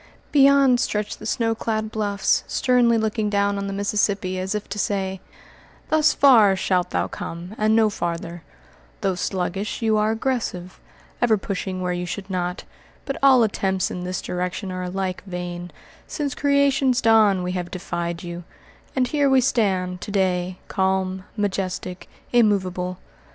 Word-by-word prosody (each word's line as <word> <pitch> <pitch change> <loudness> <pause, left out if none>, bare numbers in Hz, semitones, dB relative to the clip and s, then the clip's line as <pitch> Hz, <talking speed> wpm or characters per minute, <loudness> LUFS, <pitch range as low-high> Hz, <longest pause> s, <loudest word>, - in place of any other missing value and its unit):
Beyond 275 -3 +5
stretched 210 -2 -2
the - - -6
snow 230 -3 +1
clad 220 -1 -2
bluffs, 205 -3 +1
sternly 245 -2 +3
looking 220 -1 0
down 200 0 +1
on 200 - -3
the - - -3
Mississippi, 200 -2 0
as 190 +3 -2
if 210 - -4
to 210 - -4
say, 190 -2 -1 0.7
"'Thus 310 -1 +4
far 225 -8 +6
shalt 185 -1 0
thou 90 +1 0
come 170 - -7
and 215 0 +2
no 225 -1 +5
farther' 170 -3 -4 0.6
though 195 -2 +1
sluggish, 190 +4 -3
you 220 -1 +3
are 210 0 +2
aggressive, 225 -6 -2 0.4
ever 230 -3 +4
pushing 190 -1 -4
where 180 -1 -1
you 175 0 -3
should 195 +2 -6
not; 180 -1 -2 0.4
but 275 - -3
all 265 -3 +6
attempts 190 -3 0
in 180 - -5
this 180 +1 -4
direction 180 +2 -3
are 185 0 -4
alike 185 0 -3
vain; 175 -1 -5 0.4
since 285 -3 -3
creation's 280 -3 +2
dawn, 215 -5 +4
we 180 - -2
have 180 -1 -3
defied 175 -2 -4
you, 175 0 -6 0.5
and 255 -2 +1
here 290 -1 +2
we 265 -1 +5
stand, 195 -8 0
to - - -6
day, 185 -2 0
calm, 190 -1 -1
majestic, 185 -2 -3 0.2
immovable. 185 -5 +1
195 Hz, 155 wpm, -23 LUFS, 180-225 Hz, 0.7 s, far